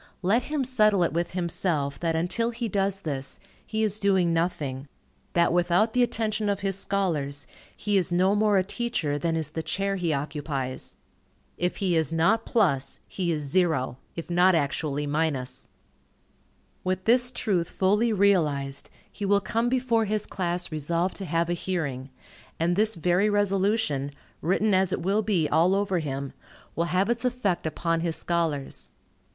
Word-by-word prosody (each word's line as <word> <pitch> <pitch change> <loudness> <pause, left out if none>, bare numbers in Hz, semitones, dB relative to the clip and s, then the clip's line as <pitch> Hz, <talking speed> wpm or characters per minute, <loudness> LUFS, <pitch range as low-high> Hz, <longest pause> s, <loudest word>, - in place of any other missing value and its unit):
Let 210 +7 +3
him 295 -2 -1
settle 215 -7 +3
it 165 - 0
with 170 +2 -1
himself, 170 -5 -1
that 165 -1 0
until 180 +8 0
he 235 0 -3
does 195 -1 -1
this, 140 -5 -4 0.2
he 220 0 -2
is 215 -1 -1
doing 190 -4 +2
nothing; 150 -5 -2 0.5
that 170 -1 +3
without 175 +5 +2
the 250 - +3
attention 220 -3 0
of 200 0 -1
his 195 -1 +1
scholars, 165 -8 -1 0.3
he 205 -1 +1
is 180 -2 0
no 185 +3 +3
more 210 -1 +3
a 185 - +3
teacher, 190 -9 -2
than 165 0 0
is 155 -2 -2
the 160 - -3
chair 195 +4 -2
he 175 -3 0
occupies. 140 -2 -4 0.6
If 180 +1 -1
he 185 -3 +1
is 160 -4 +2
not 195 +8 +2
plus, 145 - +1
he 180 -3 -2
is 150 -2 -1
zero, 150 -5 0 0.2
if 165 - -6
not 180 +1 +4
actually 145 -1 -1
minus. 145 -4 -1 1.2
With 185 0 -2
this 245 +2 +4
truth 195 -9 -1
fully 210 +5 +2
realized, 150 -9 +1 0.2
he 205 - -8
will 200 0 +3
come 225 +4 0
before 245 -3 +1
his 215 0 -1
class 175 -2 -3
resolved 170 +4 0
to 195 - -5
have 165 0 0
a 175 - 0
hearing; 145 -8 -3 0.5
and 170 +2 +2
this 215 +3 +3
very 180 +5 +2
resolution, 195 -7 +1 0.3
written 195 +5 +2
as 190 -1 +3
it - - -1
will 200 +4 +2
be 195 -7 +1
all 170 +5 +3
over 195 -3 +1
him, 140 -3 -4 0.4
will 170 - +1
have 185 +3 +1
its 235 +1 0
effect 240 -10 0
upon 165 +2 -1
his 165 -1 0
scholars. 160 -4 -2
180 Hz, 165 wpm, -26 LUFS, 160-205 Hz, 1.2 s, not